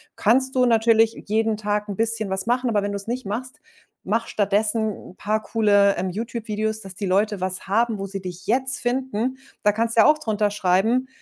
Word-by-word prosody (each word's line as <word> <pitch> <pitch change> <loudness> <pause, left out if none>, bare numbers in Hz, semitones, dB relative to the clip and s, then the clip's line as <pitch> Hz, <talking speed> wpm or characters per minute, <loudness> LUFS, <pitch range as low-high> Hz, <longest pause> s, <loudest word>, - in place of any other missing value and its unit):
Kannst 260 +5 +2
du 255 -1 +3
natürlich 225 -1 +3
jeden 220 0 0
Tag 210 0 -2
'n 200 - -4
bisschen 225 -2 +2
was 190 +3 -1
machen, 245 0 0
aber 205 - +1
wenn 205 0 -3
du 200 - -4
es 200 - -5
nicht 250 +1 -4
machst, 255 +7 -5 0.4
mache 225 +4 -2
stattdessen 215 +2 +1 0.2
'n - - -20
paar 215 +2 -1
coole, 205 -3 +2
ähm, 185 - -2
YouTube-Videos, 220 +1 -3
dass 195 -2 -6
die 200 - -4
Leute 200 +1 0
was 185 +1 0
haben, 225 +2 +1
wo 195 - -4
sie 195 0 -6
dich 180 -1 -9
jetzt 260 +3 +2
finden. 255 0 -2 0.3
Da 210 -1 +3
kannst 230 +1 +2
du - - +8
ja - - +5
auch 305 - +5
drunter 215 -6 0
schreiben, 205 +7 +1
220 Hz, 210 wpm, -22 LUFS, 200-235 Hz, 0.4 s, du